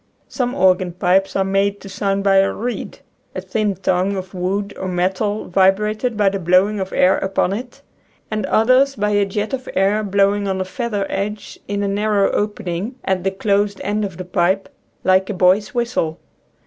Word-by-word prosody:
Some 250 -1 -2
organ 185 -6 +2
pipes 185 +2 +1
are 195 - +2
made 195 +1 0
to - - -10
sound 195 0 -1
by 195 -1 +4
a 195 0 +4
reed 245 +2 -5 0.2
— - - -40
a - - -2
thin 210 -3 -1
tongue 185 +1 0
of 185 -1 -6
wood 195 +3 -2
or 190 - -3
metal 190 +4 -1
vibrated 210 +5 +1
by 205 -2 +4
the 195 0 -3
blowing 185 +4 +3
of 190 0 -4
air 185 +1 +3
upon 190 -1 0
it 245 +4 -7 0.2
— - - -38
and 215 0 -2
others 255 +5 +3
by 210 -2 0
a 205 -1 +3
jet 210 +5 -3
of 260 -1 -4
air 200 +3 +2
blowing 200 0 +1
on 190 -1 -1
a 185 - -1
feather 205 0 -3
edge 205 +2 -4
in 205 0 -2
a - - 0
nar 205 0 +1
row - - +2
opening 205 +2 -3
at 190 -2 0
the 195 - +2
closed 200 +1 0
end 210 +1 -1
of 190 -4 -5
the 185 - -6
pipe, 185 +2 0 0.3
like 190 0 +3
a 210 - -2
boy's 190 +5 +2
whistle. 235 -10 -1
200 Hz, 200 wpm, -19 LUFS, 190-210 Hz, 0.3 s, by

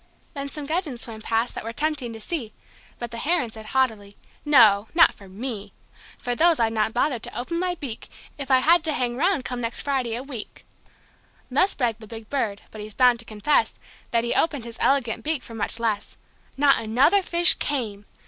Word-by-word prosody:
Then 280 -2 -5
some 295 0 -6
gudgeon 310 -4 -2
swam 225 -2 -6
past 230 +2 -1
that - - -6
were 225 - -5
tempting 290 -2 -2
to 225 - -9
see, 235 -2 -4 0.4
But 240 -1 -6
the 230 - -6
Heron 295 -6 0
said 220 -1 -10
hautily: 220 -7 -1 0.3
"No 225 -8 +5
not 335 - +6
for 195 -2 -15
me. 205 -1 -6 0.4
For 245 - -3
those 330 +4 +3
I'd 225 -1 +1
not 220 0 0
bother 250 +2 0
to 225 - -5
open 335 +7 -3
my 360 0 -1
beak, 275 -9 -7 0.3
If 280 -2 -7
I 260 -1 +5
had 335 +2 +4
to 315 - +2
hang 245 -3 -1
'round 330 -1 +1
come 250 -1 -4
next 230 0 -3
Friday 260 -5 -1
a 245 - -4
week." 255 -6 -8 0.9
Thus 370 +10 +2
bragged 235 -4 -1
the 220 - -12
big 225 0 -10
Bird. 220 -8 -2
But 215 - -9
he's 210 0 -8
bound 250 -2 +4
to 230 - -5
confess 215 +8 0 0.3
That 230 -1 +1
he 235 - -1
opened 290 -7 0
his 235 0 -9
elegant 265 -5 +1
beak 305 -3 -1
for 230 - -11
much 225 +1 -1
less. 220 -3 -2 0.4
Not 275 -2 +4
another 270 - +3
fish 345 -1 +7
came. 215 -8 -4
245 Hz, 205 wpm, -24 LUFS, 225-290 Hz, 0.9 s, fish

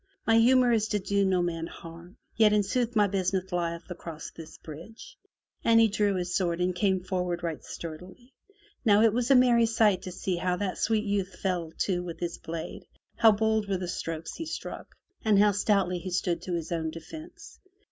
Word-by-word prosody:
"My 225 0 +4
humor 250 +1 +5
is 220 -2 +2
to 210 -1 0
do 200 +1 0
no 185 -2 +2
man 165 -1 -2
harm, 170 +6 -12 0.2
yet 215 -2 +5
in 210 -1 +3
sooth 240 +3 -1
my 210 -1 +5
business 190 -1 -1
lieth 170 -1 -2
across 165 -3 -8
this 160 -1 -11
bridge!" 220 - -11 0.5
And 230 0 +5
he 225 -1 +5
drew 205 -1 +1
his 180 -1 -2
sword 175 -3 0
and 180 +1 +1
came 190 -1 +1
forward 180 -2 -2
right 165 -2 -4
sturdily. 180 - -9 0.5
Now 210 -2 +5
it 225 -2 +4
was 245 +2 0
a 275 - +7
merry 240 -2 +5
sight 215 -4 +3
to 185 - -7
see 180 0 -2
how 180 +1 0
that 190 0 -3
sweet 220 -1 +1
youth 195 -2 -2
fell 175 -4 -2
to 180 -3 0
with 175 -2 -7
his 170 -1 -4
blade, 165 0 -7 0.3
how 225 - +6
bold 220 0 +1
were 195 - +1
the 180 -1 -4
strokes 165 -2 -4
he 325 - -5
struck, - - -7 0.3
and 215 -3 +4
how 205 +1 +5
stoutly 195 -3 +1
he 185 - -6
stood 180 -1 -1
to 180 - -5
his 165 -1 -4
own 160 -2 -1
defence. 170 - -11
190 Hz, 200 wpm, -28 LUFS, 175-220 Hz, 0.5 s, a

